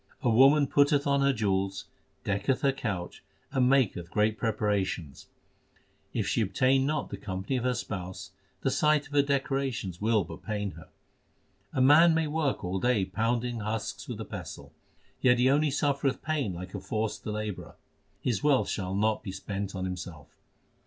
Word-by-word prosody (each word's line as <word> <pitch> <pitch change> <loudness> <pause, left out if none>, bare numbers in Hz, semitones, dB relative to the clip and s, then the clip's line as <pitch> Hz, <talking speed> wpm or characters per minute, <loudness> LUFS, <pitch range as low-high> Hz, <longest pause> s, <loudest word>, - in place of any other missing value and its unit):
A 120 - +3
woman 135 +5 +6
putteth 145 +1 +3
on 140 -1 +2
her 140 0 +4
jewels, 100 -4 -1 0.4
decketh 100 +6 0
her 140 - +3
couch, 105 -9 -4 0.3
and 130 -2 +3
maketh 110 -11 +2
great 105 +2 +1
preparations: 100 - -2 0.8
If - - -1
she - - +1
obtain 130 +7 +2
not 150 0 -1
the 100 - -4
company 95 +4 -4
of 125 - -3
her 125 -1 +1
spouse, 95 -6 -6 0.3
the - - +1
sight 150 -1 +2
of 145 - -14
her 145 - +5
decorations 135 -9 -2
will 110 -1 +3
but 85 - -10
pain 105 -2 -3
her. - - -13 0.8
A 130 - 0
man 160 +5 +7
may 160 0 +2
work 150 -5 -1
all 95 +1 -2
day 120 -3 +2
pounding 115 +4 -1
husks 110 +1 -4
with - - -6
a - - -5
pestle; - - -8 0.4
x - - -40
Yet 125 -1 +5
he 125 +2 +4
only 150 +2 +3
suffereth 140 -1 0
pain 150 -9 -1
like 90 +1 -7
a 100 - -4
forced 110 +3 -3
labourer; 105 -2 -4 0.5
his 120 -6 -1
wealth 145 -3 +3
shall 95 -2 -2
not 110 +2 +1
be 95 - -6
spent 100 +1 -5
on 95 0 -3
himself. 90 -5 -7
115 Hz, 175 wpm, -28 LUFS, 100-135 Hz, 0.8 s, man